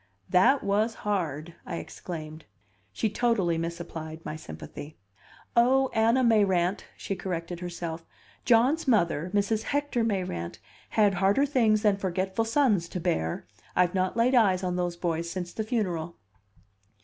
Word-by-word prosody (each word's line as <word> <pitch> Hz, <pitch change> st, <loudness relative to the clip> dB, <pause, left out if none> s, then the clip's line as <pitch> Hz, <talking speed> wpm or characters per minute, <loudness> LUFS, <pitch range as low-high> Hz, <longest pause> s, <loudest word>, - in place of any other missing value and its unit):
"That 250 Hz, +10 st, +5 dB
was 210 Hz, +3 st, +1 dB
hard!" 170 Hz, -5 st, -2 dB
I -, -, -5 dB
exclaimed. 155 Hz, -2 st, -7 dB, 0.5 s
She 105 Hz, -, -1 dB
totally 205 Hz, -7 st, +1 dB
misapplied 165 Hz, -1 st, -6 dB
my 155 Hz, -, -4 dB
sympathy. 145 Hz, -, -9 dB, 0.6 s
"Oh, 260 Hz, +3 st, +4 dB
Anna 230 Hz, +4 st, +3 dB
Mayrant," 200 Hz, -5 st, +2 dB
she 195 Hz, -, -4 dB
corrected 175 Hz, -2 st, -4 dB
herself, 170 Hz, -2 st, -5 dB, 0.4 s
"John's 255 Hz, +7 st, +3 dB
mother, 175 Hz, -, +2 dB
Mrs. 205 Hz, +2 st, +1 dB
Hector 285 Hz, -3 st, -1 dB
Mayrant, 180 Hz, -, -2 dB, 0.4 s
had 205 Hz, -2 st, +5 dB
harder 195 Hz, +9 st, +3 dB
things 225 Hz, -7 st, +2 dB
than 205 Hz, -2 st, +3 dB
forgetful 190 Hz, +3 st, -1 dB
sons 225 Hz, -, +2 dB
to 180 Hz, -, -4 dB
bear! 160 Hz, -, -1 dB, 0.3 s
I've 180 Hz, -1 st, +3 dB
not 185 Hz, +2 st, 0 dB
laid 240 Hz, +3 st, +3 dB
eyes 195 Hz, -7 st, +4 dB
on 180 Hz, -1 st, -1 dB
those 175 Hz, -1 st, -1 dB
boys 170 Hz, -1 st, -2 dB
since 175 Hz, 0 st, -5 dB
the 220 Hz, -, -2 dB
funeral." 180 Hz, -8 st, -2 dB
190 Hz, 135 wpm, -27 LUFS, 170-225 Hz, 0.6 s, That